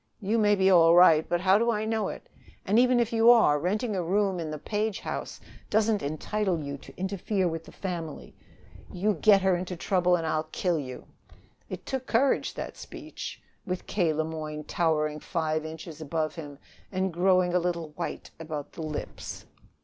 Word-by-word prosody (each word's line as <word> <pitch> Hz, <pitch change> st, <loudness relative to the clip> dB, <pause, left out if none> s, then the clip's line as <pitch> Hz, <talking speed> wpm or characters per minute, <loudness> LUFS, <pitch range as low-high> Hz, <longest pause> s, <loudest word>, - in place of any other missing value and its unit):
You 215 Hz, +2 st, 0 dB
may 205 Hz, -1 st, +4 dB
be 190 Hz, -1 st, +2 dB
all 170 Hz, -2 st, +7 dB
right, 165 Hz, -3 st, +6 dB
but 175 Hz, 0 st, +1 dB
how 190 Hz, +2 st, +4 dB
do 235 Hz, +1 st, +2 dB
I 215 Hz, -2 st, 0 dB
know 220 Hz, -2 st, 0 dB
it? -, -, -7 dB, 0.4 s
And, 210 Hz, +4 st, +3 dB
even 250 Hz, 0 st, +4 dB
if 235 Hz, -1 st, 0 dB
you 225 Hz, +1 st, +5 dB
are, 220 Hz, -12 st, +6 dB
renting 210 Hz, -, -1 dB
a 185 Hz, -, 0 dB
room 190 Hz, +1 st, +1 dB
in 160 Hz, -2 st, -4 dB
the 155 Hz, -, -4 dB
Page 210 Hz, +4 st, -2 dB
house -, -, -5 dB, 0.3 s
doesn't 215 Hz, -1 st, +2 dB
entitle 175 Hz, +5 st, -1 dB
you 140 Hz, -2 st, -5 dB
to -, -, -15 dB
interfere 190 Hz, 0 st, -1 dB
with 165 Hz, -1 st, -4 dB
the -, -, -13 dB
family. 170 Hz, -5 st, -6 dB, 0.6 s
You 205 Hz, +4 st, 0 dB
get 195 Hz, +2 st, +4 dB
her 190 Hz, -1 st, +3 dB
into 180 Hz, +1 st, -4 dB
trouble 180 Hz, 0 st, +2 dB
and 165 Hz, -2 st, -2 dB
I'll 155 Hz, 0 st, 0 dB
kill 175 Hz, -4 st, 0 dB
you!" 130 Hz, -3 st, -7 dB, 0.6 s
It -, -, -7 dB
took 265 Hz, -1 st, -4 dB
courage, 260 Hz, +4 st, +1 dB
that -, -, -6 dB
speech, -, -, -8 dB, 0.2 s
with 185 Hz, 0 st, -3 dB
K. 175 Hz, -6 st, +1 dB
Le 155 Hz, +1 st, 0 dB
Moyne 155 Hz, -1 st, -5 dB
towering 155 Hz, -2 st, 0 dB
five 155 Hz, -1 st, -2 dB
inches 160 Hz, 0 st, -8 dB
above 155 Hz, 0 st, -2 dB
him 145 Hz, -4 st, -8 dB, 0.3 s
and 190 Hz, -2 st, -1 dB
growing 180 Hz, 0 st, +3 dB
a 180 Hz, -, +4 dB
little 170 Hz, -2 st, -2 dB
white 150 Hz, -, -6 dB
about 155 Hz, -3 st, -6 dB
the -, -, -8 dB
lips. 155 Hz, -2 st, -6 dB
180 Hz, 190 wpm, -27 LUFS, 160-205 Hz, 0.6 s, all